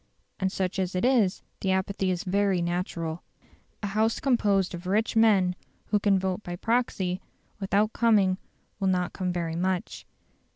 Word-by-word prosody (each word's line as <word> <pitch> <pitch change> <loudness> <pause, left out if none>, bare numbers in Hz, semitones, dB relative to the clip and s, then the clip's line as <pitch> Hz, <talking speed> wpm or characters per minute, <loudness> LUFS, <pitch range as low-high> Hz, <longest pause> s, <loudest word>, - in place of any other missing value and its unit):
And 190 -1 0
such 190 0 -2
as 185 -1 -1
it 180 - +1
is, 235 -8 +2 0.2
the 190 - -1
apathy 190 0 0
is 180 -1 -1
very 195 -1 +1
natural. 170 -1 -2 0.6
A - - 0
House 220 +2 +2
composed 205 -8 +2
of 175 +1 -7
rich 215 +4 +1
men 200 -5 +4 0.3
who 210 - +3
can 200 -1 +3
vote 190 +1 -1
by 175 -3 -5
proxy 195 -4 0 0.4
without 205 +2 +1
coming 200 -5 +3 0.4
will 195 - 0
not 180 -1 +1
come 185 -2 -2
very 170 -2 -2
much. 185 +1 -2
190 Hz, 160 wpm, -27 LUFS, 180-210 Hz, 0.6 s, men